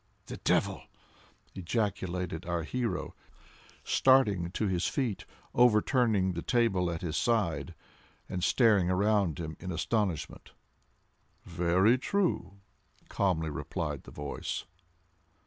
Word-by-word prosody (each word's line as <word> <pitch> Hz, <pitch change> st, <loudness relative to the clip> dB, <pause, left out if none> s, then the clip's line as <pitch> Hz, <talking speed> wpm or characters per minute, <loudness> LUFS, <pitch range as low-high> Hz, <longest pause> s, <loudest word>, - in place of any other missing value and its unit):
"The -, -, -7 dB
devil!" -, -, +1 dB, 0.7 s
ejaculated 90 Hz, -3 st, -2 dB
our 85 Hz, -1 st, -1 dB
hero, 115 Hz, +1 st, -3 dB, 0.7 s
starting 105 Hz, -10 st, +3 dB
to 110 Hz, -, -1 dB
his 90 Hz, -2 st, 0 dB
feet, 125 Hz, -8 st, -2 dB, 0.3 s
overturning 110 Hz, -4 st, +3 dB
the 85 Hz, -, -4 dB
table 100 Hz, -7 st, +1 dB
at 85 Hz, 0 st, -4 dB
his 80 Hz, -3 st, -3 dB
side, 85 Hz, -5 st, 0 dB, 0.5 s
and 90 Hz, -2 st, -4 dB
staring 105 Hz, -5 st, +4 dB
around 100 Hz, -3 st, +2 dB
him 80 Hz, -2 st, -5 dB
in 90 Hz, +1 st, -5 dB
astonishment. 90 Hz, 0 st, -2 dB, 0.9 s
"Very 95 Hz, +8 st, +2 dB
true," 150 Hz, -, -1 dB, 0.5 s
calmly 80 Hz, -5 st, 0 dB
replied -, -, -4 dB
the -, -, -11 dB
voice. 75 Hz, -1 st, -5 dB
95 Hz, 105 wpm, -30 LUFS, 85-110 Hz, 0.9 s, staring